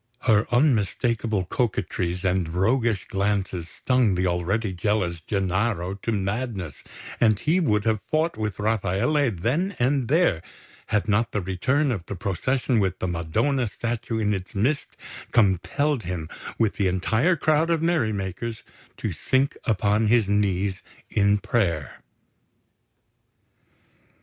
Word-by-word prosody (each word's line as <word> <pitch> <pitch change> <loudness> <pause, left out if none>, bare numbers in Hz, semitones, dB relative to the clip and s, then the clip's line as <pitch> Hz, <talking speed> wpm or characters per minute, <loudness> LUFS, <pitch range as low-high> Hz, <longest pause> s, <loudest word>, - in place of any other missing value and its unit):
Her 110 -3 +3
unmistakable 115 -5 +1
coquetries 90 -4 -2
and 90 -2 +1
roguish 110 +4 +1
glances 95 -3 -1
stung 125 -4 +1
the 90 +1 0
already 95 +4 0
jealous 90 -3 -1
Gennaro 95 0 -1
to 100 +3 -4
madness; 100 - -3 0.4
and 110 -2 +4
he 160 - +1
would 105 - +2
have 110 -2 +1
fought 160 0 +1
with 105 -4 -3
Rafaele 110 +7 +1
then 130 - -1
and 130 0 +1
there 150 - +3 0.5
had 110 0 0
not 110 +3 +1
the 105 - +1
return 130 +11 0
of 100 -8 -3
the 100 - -4
procession 115 +7 0
with 95 -2 0
the 95 - -2
Madonna 90 - 0
statue 115 +1 -3
in 105 -1 +1
its 95 0 -5
midst 130 +9 -1 0.3
compelled 120 - +2
him, 85 -4 -5 0.3
with 110 -3 +1
the 100 - +2
entire 110 - +2
crowd 155 +1 +2
of 165 -1 +1
merry 160 -10 +2
makers, 100 +3 -4 0.3
to - - -3
sink 130 +1 +1
upon 105 -1 +2
his 115 -2 +3
knees 100 -2 0 0.3
in 100 0 +3
prayer. 85 - -1
105 Hz, 130 wpm, -24 LUFS, 95-120 Hz, 0.5 s, and